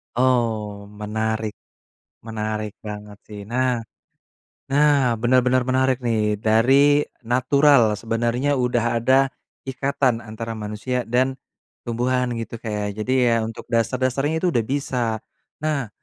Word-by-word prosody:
Oh, 110 Hz, -5 st, 0 dB
menarik, 110 Hz, +1 st, -3 dB, 0.7 s
menarik 110 Hz, -1 st, -4 dB
banget 105 Hz, -1 st, -7 dB
sih. 105 Hz, -1 st, -10 dB
Nah, 125 Hz, +1 st, 0 dB, 0.9 s
nah 140 Hz, -3 st, +3 dB
benar-benar 125 Hz, +2 st, +3 dB
menarik 130 Hz, 0 st, +1 dB
nih. 110 Hz, -3 st, +1 dB
Dari 135 Hz, +8 st, +4 dB, 0.2 s
natural, 130 Hz, -1 st, +4 dB
sebenarnya 120 Hz, +5 st, 0 dB
udah 120 Hz, -1 st, +1 dB
ada 130 Hz, +3 st, +4 dB, 0.4 s
ikatan 130 Hz, -2 st, 0 dB
antara 115 Hz, 0 st, -7 dB
manusia 110 Hz, +3 st, -3 dB
dan 130 Hz, +3 st, +1 dB, 0.5 s
tumbuhan 125 Hz, +2 st, 0 dB
gitu, 115 Hz, 0 st, -6 dB
Kak, 115 Hz, -, -9 dB
ya. 105 Hz, -1 st, -2 dB
Jadi 110 Hz, +5 st, -2 dB
ya 115 Hz, -1 st, +3 dB
untuk 115 Hz, +2 st, -6 dB
dasar-dasarnya 130 Hz, -, 0 dB
itu 180 Hz, -, +3 dB
udah 120 Hz, -7 st, +1 dB
bisa. 135 Hz, -3 st, -1 dB, 0.6 s
Nah, 145 Hz, -6 st, 0 dB
120 Hz, 115 wpm, -22 LUFS, 110-130 Hz, 0.9 s, Dari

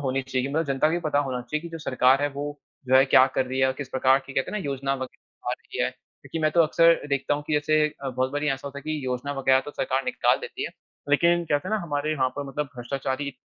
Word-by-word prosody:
होनी 135 Hz, -1 st, 0 dB
चाहिए 130 Hz, 0 st, -2 dB
मतलब 160 Hz, +3 st, 0 dB
जनता 135 Hz, +2 st, +2 dB
को -, -, -1 dB
भी 175 Hz, -, +1 dB
पता 145 Hz, -2 st, +2 dB
होना 130 Hz, -3 st, -1 dB
चाहिए 150 Hz, +5 st, -3 dB
की 170 Hz, -, -6 dB
जो 165 Hz, 0 st, -7 dB
सरकार 130 Hz, -3 st, +3 dB
है 145 Hz, -, +2 dB
वो 145 Hz, -, -2 dB, 0.4 s
जो 130 Hz, -, +4 dB
है 135 Hz, -, +7 dB
क्या 130 Hz, -1 st, +6 dB
कर 130 Hz, -, +2 dB
रही 130 Hz, +1 st, -3 dB
है 130 Hz, -, +5 dB
और 130 Hz, -, +1 dB
किस 140 Hz, -, -5 dB
प्रकार 130 Hz, +1 st, +3 dB
की 135 Hz, -, -8 dB
कहते 135 Hz, -, -1 dB
है 210 Hz, -, -2 dB
ना -, -, -5 dB
योजना 135 Hz, -1 st, -1 dB
वग़ैरह 130 Hz, -1 st, -9 dB
आ -, -, 0 dB
रही -, -, -4 dB
है। 65 Hz, -, +1 dB
क्योंकि 165 Hz, -, -10 dB
मैं 155 Hz, -1 st, +2 dB
तो 170 Hz, -, +4 dB
अक्सर 165 Hz, 0 st, +4 dB
देखता 140 Hz, +1 st, 0 dB
हूँ 145 Hz, -, -4 dB
की -, -, -3 dB
जैसे 155 Hz, +1 st, +3 dB, 0.2 s
अ, 135 Hz, -, -2 dB
बहुत 130 Hz, +1 st, -1 dB
बारी 145 Hz, +1 st, -1 dB
ऐसा 135 Hz, 0 st, -2 dB
होता 140 Hz, 0 st, -8 dB
है -, -, -11 dB
कि 155 Hz, -1 st, -3 dB
योजना 125 Hz, +3 st, -2 dB
वग़ैरह 130 Hz, 0 st, +4 dB
तो 145 Hz, -, -8 dB
सरकार 135 Hz, -1 st, -1 dB
निकाल -, -, +2 dB
देती -, -, -5 dB
है -, -, -4 dB, 0.4 s
लेकिन 170 Hz, +3 st, +4 dB
कहते 145 Hz, -3 st, -1 dB
है 215 Hz, -, +1 dB
ना 215 Hz, -, 0 dB
हमारे 155 Hz, -1 st, -1 dB
वहाँ 130 Hz, -3 st, +1 dB
पर 145 Hz, -, -3 dB
मतलब 145 Hz, +2 st, -2 dB
भ्रष्टाचारी 135 Hz, +3 st, -3 dB
140 Hz, 280 wpm, -25 LUFS, 130-150 Hz, 0.4 s, है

